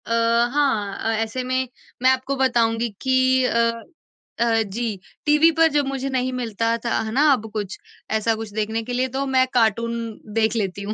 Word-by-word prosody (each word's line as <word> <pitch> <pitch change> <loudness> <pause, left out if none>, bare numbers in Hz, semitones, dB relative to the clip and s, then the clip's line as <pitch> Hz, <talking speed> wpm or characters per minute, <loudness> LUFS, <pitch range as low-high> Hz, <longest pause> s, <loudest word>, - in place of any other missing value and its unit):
अ, - - -7 0.4
हाँ, 225 -9 +1
अ, 225 - -1
ऐसे 240 +3 -4
में 255 +1 -1 0.3
मैं 255 - +5
आपको 260 +1 -1
बताऊँगी 235 -3 +1
कि 260 0 +3
अ 230 -1 +2 0.7
अ, 230 -1 +3
जी, 225 -3 -3 0.3
टीवी 300 +2 +5
पर 325 0 +6
जब 290 -1 +2
मुझे 275 0 -3
नहीं 255 -1 -1
मिलता 230 -2 -1
था, - - 0
है 220 -1 -4
ना, 265 +5 +2
अब 220 -4 -3
कुछ, 205 -3 -4 0.3
ऐसा 220 +1 +1
कुछ 220 -1 -7
देखने 220 +1 -1
के 245 +2 -5
लिए, 255 +1 +1
तो 265 +2 -3
मैं 260 -1 +4
कार्टून 230 0 +2 0.4
देख 220 0 +1
लेती 200 -3 -2
हूँ। 210 +2 -3
235 Hz, 185 wpm, -22 LUFS, 220-260 Hz, 0.7 s, पर